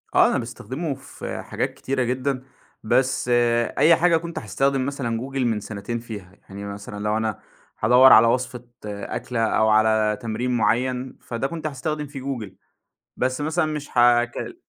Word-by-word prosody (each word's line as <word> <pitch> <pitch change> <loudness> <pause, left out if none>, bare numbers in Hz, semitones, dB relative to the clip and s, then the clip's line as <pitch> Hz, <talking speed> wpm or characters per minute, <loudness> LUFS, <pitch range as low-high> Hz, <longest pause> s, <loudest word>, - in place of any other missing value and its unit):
آه - - +7
أنا - - +1
باستخدمه 130 +6 -4
في 135 - -7
حاجات - - -3
كتيرة 130 -1 -2
جدًا. 130 +2 -1 0.4
بس 130 +2 +1 0.5
أي 160 +4 +6
حاجة 170 0 +3
كنت 170 +1 -5
هاستخدم 135 +5 0
مثلًا 130 -5 -2
Google 135 +3 -7
من 120 -5 +1
سنتين 105 +3 -5
فيها. 105 -6 -9 0.2
يعني 100 +1 -7
مثلًا 100 0 -7
لو 105 +1 +1
أنا 110 -2 -2 0.4
هادوّر 125 +4 +7
على 115 +1 +8
وصفة 125 0 -1 0.2
أكلة، 105 +3 -4
أو 110 0 +2
على 110 0 +3
تمرين 115 +2 -2
مُعيّن 125 +3 0
فده 120 +3 -3
كنت 160 0 -4
هاستخدم 150 +1 -3
فيه 140 -1 -8
Google، 125 -7 -4 0.7
بس 130 +2 -1
مثلًا 160 +2 +1
مش 150 -4 -4
هاكل 120 - +2
125 Hz, 155 wpm, -23 LUFS, 110-135 Hz, 0.7 s, على